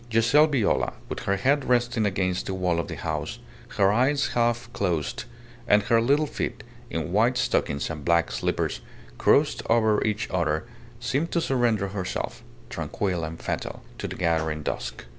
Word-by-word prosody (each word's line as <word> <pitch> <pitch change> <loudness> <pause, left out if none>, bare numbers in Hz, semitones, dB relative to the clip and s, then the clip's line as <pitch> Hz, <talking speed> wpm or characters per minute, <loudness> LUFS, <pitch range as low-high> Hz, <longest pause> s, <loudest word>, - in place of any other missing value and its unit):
Giselle 115 +7 +5
Viola, 135 -8 +1 0.2
with - - -4
her 100 - +2
head 135 +8 +2
resting 120 -3 +2
against 95 -2 -1
the 95 - -2
wall 90 -2 0
of 85 - -2
the - - -5
house, - - -3 0.4
her 100 0 +5
eyes 135 +6 +2
half 120 0 +1
closed, 85 - -1 0.4
and 105 -1 +5
her 115 +2 +3
little 140 +6 +3
feet, 120 - -4 0.3
in 80 0 -3
white 115 +6 +3
stockings 70 - 0
and 75 -3 -6
black 85 +1 +2
slippers, - - -1 0.4
crossed - - +3
over 110 -2 +3
each 110 +2 -1
other, 80 -1 0 0.3
seemed 135 +7 -1
to 170 - +3
surrender 120 - +1
herself, 95 -2 -4 0.3
tranquil 90 -5 -2
and 80 +1 -5
fatal, - - -4 0.2
to - - -3
the - - -6
gathering 80 -2 0
dusk. 60 -3 -4
105 Hz, 160 wpm, -26 LUFS, 85-120 Hz, 0.4 s, Giselle